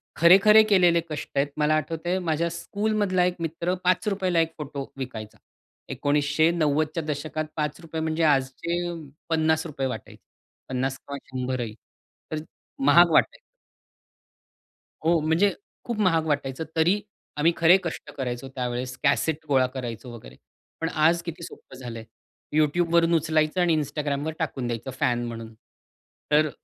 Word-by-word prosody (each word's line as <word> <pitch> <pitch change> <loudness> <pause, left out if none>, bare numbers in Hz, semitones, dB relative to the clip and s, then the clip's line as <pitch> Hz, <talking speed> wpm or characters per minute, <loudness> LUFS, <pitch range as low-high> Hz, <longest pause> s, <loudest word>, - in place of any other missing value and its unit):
खरे-खरे 200 +6 +7
केलेले 175 -4 +5
कष्ट 150 -1 -5
आहेत. 140 +1 +3
मला 150 0 +3
आठवतंय, 165 +4 -1
माझ्या 170 -1 0
स्कूलमधला 200 +1 0
1 180 0 0
मित्र 165 +2 -2
₹5 185 -1 +1
1 165 0 +1
फोटो 145 -2 -5
विकायचा. 115 -5 -7 0.5
1990च्या 155 +2 +1
दशकात 155 +1 -3
₹5 160 +1 -3
म्हणजे 160 +1 0
आजचे 150 +4 +1
अ, - - -4 0.4
₹50 160 -3 0
वाटायचे. 130 - -8 0.5
50 130 +1 -1
किंवा 140 0 -7
100 130 0 -3
ही, 115 -3 -4 0.6
तर 155 - -2 0.5
महाग 170 +4 +7
वाटायचं. - - +3 1.7
हो, 165 0 +4
म्हणजे 160 +6 +2 0.3
खूप 235 -2 -3
महाग 165 -6 +3
वाटायचं. 145 -1 -1
तरी 175 +6 +3 0.4
आम्ही 155 +3 +4
खरे 170 +3 +6
कष्ट 170 - -5
करायचो 125 -1 -4
त्यावेळेस, 125 0 -3
कॅसेट 150 +2 +1
गोळा 130 -2 +4
करायचो 120 -2 -6
वगैरे. 65 - -12 0.5
पण 165 - 0
आज 165 +2 +3
किती 170 0 -7
सोपं - - -11
झालंय. 120 -3 -7 0.5
YouTubeवरून 165 +2 +3
उचलायचं 155 +2 +1
आणि 170 -2 +3
Instagramवर 145 +1 -3
टाकून 135 -6 -2
द्यायचं, 120 +2 -4
फॅन 120 -1 +1
म्हणून. 115 -1 -7 0.8
तर 155 +1 +4
155 Hz, 130 wpm, -25 LUFS, 135-170 Hz, 1.7 s, खरे-खरे